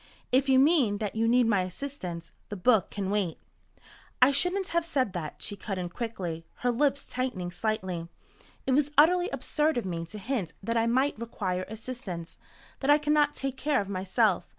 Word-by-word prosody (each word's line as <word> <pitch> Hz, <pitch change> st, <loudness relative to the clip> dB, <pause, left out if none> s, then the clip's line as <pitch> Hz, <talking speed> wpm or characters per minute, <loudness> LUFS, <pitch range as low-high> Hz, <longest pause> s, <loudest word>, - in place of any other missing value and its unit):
"If 265 Hz, +2 st, +3 dB
you 260 Hz, -, +6 dB
mean 270 Hz, -7 st, +4 dB
that 210 Hz, -1 st, -3 dB
you 225 Hz, +1 st, +2 dB
need 245 Hz, +1 st, +4 dB
my 205 Hz, -4 st, +3 dB
assistance, 180 Hz, -4 st, -6 dB, 0.2 s
the 205 Hz, -, -4 dB
book 205 Hz, 0 st, +3 dB
can 195 Hz, -2 st, -3 dB
wait." 195 Hz, -6 st, 0 dB, 0.8 s
"I 255 Hz, +3 st, +7 dB
shouldn't 365 Hz, +6 st, +2 dB
have 340 Hz, 0 st, +1 dB
said 260 Hz, -, 0 dB
that," 160 Hz, -5 st, -5 dB
she 205 Hz, -, -3 dB
cut 200 Hz, -1 st, -5 dB
in 180 Hz, -1 st, -3 dB
quickly, 180 Hz, -6 st, -4 dB, 0.2 s
her 245 Hz, -, +4 dB
lips 280 Hz, +3 st, +1 dB
tightening 245 Hz, -9 st, -3 dB
slightly. 185 Hz, -4 st, -2 dB, 0.6 s
"It -, -, 0 dB
was 285 Hz, +2 st, +3 dB
utterly 355 Hz, +5 st, +5 dB
absurd 310 Hz, -, 0 dB
of 240 Hz, -, -1 dB
me 170 Hz, -2 st, -3 dB
to 210 Hz, -, -8 dB
hint 205 Hz, -, -3 dB
that 230 Hz, +3 st, -1 dB
I 230 Hz, 0 st, +2 dB
might 260 Hz, +1 st, +1 dB
require 185 Hz, -5 st, -3 dB
assistance 220 Hz, -7 st, -7 dB, 0.4 s
that 270 Hz, -, -2 dB
I 295 Hz, -, +8 dB
cannot 295 Hz, -1 st, +2 dB
take 270 Hz, -1 st, -3 dB
care 295 Hz, +1 st, +1 dB
of 200 Hz, -, -3 dB
myself. 195 Hz, +1 st, +1 dB
230 Hz, 185 wpm, -28 LUFS, 185-275 Hz, 0.8 s, I